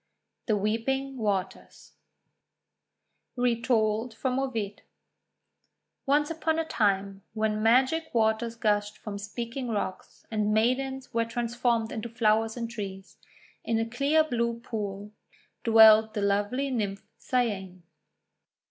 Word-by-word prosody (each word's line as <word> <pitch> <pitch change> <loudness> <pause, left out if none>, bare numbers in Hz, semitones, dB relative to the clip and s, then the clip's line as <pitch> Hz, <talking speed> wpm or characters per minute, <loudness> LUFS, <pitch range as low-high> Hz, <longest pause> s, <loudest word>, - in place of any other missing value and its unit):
THE 215 -3 +2
WEEPING 260 +6 -1
WATERS 200 -4 -3 1.4
Retold 230 -2 +1
from 255 +2 -1
Ovid 225 -7 -3 1.3
ONCE 295 +3 +2
upon 320 0 -1
a 325 - 0
time, 200 -6 0
when 215 -1 0
Magic 260 +8 +3
Waters 225 0 +1
gushed 210 -2 0
from 200 -2 -7
Speaking 235 +5 -5
Rocks, 205 -4 -4
and 210 -1 +1
maidens 260 +4 0
were 230 0 +1
trans 235 0 -3
formed 235 -2 +1
into 230 0 -5
flowers 225 0 +1
and 235 -1 -3
trees, 195 -4 -7 0.5
in 230 - 0
a 225 - 0
clear 280 +7 +2
blue 235 -5 -1
pool 205 -2 -5 0.5
dwelt 220 -1 +7
the 210 - -1
lovely 205 +8 0
Nymph 205 -4 -2
Cyane. 195 -8 -2
225 Hz, 115 wpm, -28 LUFS, 210-250 Hz, 1.4 s, dwelt